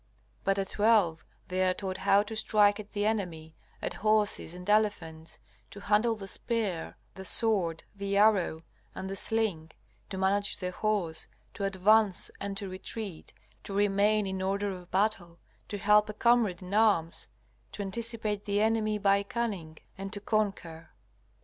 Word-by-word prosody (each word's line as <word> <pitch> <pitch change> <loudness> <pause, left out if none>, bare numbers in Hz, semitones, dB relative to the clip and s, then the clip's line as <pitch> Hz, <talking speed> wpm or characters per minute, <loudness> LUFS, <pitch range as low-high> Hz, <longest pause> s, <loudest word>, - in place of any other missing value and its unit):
But 195 0 +1
at 195 -1 -2
twelve 205 -7 +2 0.3
they 185 +1 -1
are 185 -1 +2
taught 190 -2 -4
how 200 +1 +3
to 220 +1 -7
strike 210 -1 +3
at 210 0 -10
the 205 -1 -1
enemy, 175 -8 -2 0.3
at - - -2
horses 215 -5 +2
and 180 +1 -10
elephants, 180 -7 0 0.3
to 200 - -10
handle 215 +3 +2
the 200 -3 -8
spear, 205 -6 -2 0.2
the 190 - -9
sword, 190 -6 +2
the 200 0 -2
arrow, 200 -6 +3 0.3
and 190 - -5
the 195 - -4
sling; 195 -7 -1 0.4
to 190 - -5
manage 200 +2 +2
the 180 -1 -4
horse, 180 -5 -2 0.3
to 200 - -3
advance 195 +1 +3
and 200 0 -4
to 200 -1 -3
retreat, 185 -1 -7 0.3
to 200 - -7
remain 205 +1 +2
in 190 -1 -3
order 200 +1 -1
of 180 -1 -9
battle, 190 -4 -1 0.3
to 205 - -5
help 210 +1 +4
a 210 - -6
comrade 235 -7 +2
in 180 +2 -8
arms, 205 -7 +2 0.4
to 205 - -5
anticipate 215 0 -3
the 205 0 0
enemy 215 -1 +1
by 200 -1 +3
cunning, 200 -7 -4 0.2
and 195 0 -5
to 205 - -3
conquer. 200 -6 -2
200 Hz, 160 wpm, -29 LUFS, 185-215 Hz, 0.4 s, help